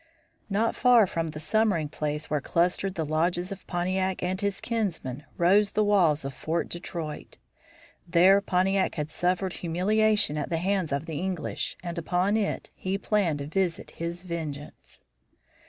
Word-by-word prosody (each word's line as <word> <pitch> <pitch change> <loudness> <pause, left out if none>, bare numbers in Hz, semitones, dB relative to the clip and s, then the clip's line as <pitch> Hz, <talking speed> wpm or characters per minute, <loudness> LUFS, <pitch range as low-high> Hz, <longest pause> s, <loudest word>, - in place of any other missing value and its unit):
Not 215 +3 +1
far 245 -3 +6
from 165 -3 -2
the 155 -1 -6
summering 170 0 +1
place 150 0 -3
where 150 -1 -1
clustered 180 +5 0
the 160 -3 -1
lodges 175 +4 0
of 195 - -8
Pontiac 185 +1 -1
and 185 +2 -1
his 200 -1 -1
kinsmen 165 - -3
rose 200 +4 +4
the 215 - +3
walls 175 -9 +3
of 135 - -4
Fort 160 +6 -2
Detroit. 170 -3 -6 0.7
There 185 +3 +6
Pontiac 190 0 +1
had 150 0 -3
suffered 180 +2 0
humiliation 205 0 +1
at 145 - -3
the 165 - 0
hands 185 -1 0
of 140 +3 -1
the 160 -3 -4
English, 185 -2 -3
and 170 -1 -4
upon 180 +5 +1
it 215 -2 -1
he 190 +1 -2
planned 200 -7 +1
to 140 - -5
visit 175 +2 -1
his 170 +2 -5
vengeance. 155 -5 -7
175 Hz, 155 wpm, -27 LUFS, 160-195 Hz, 0.7 s, far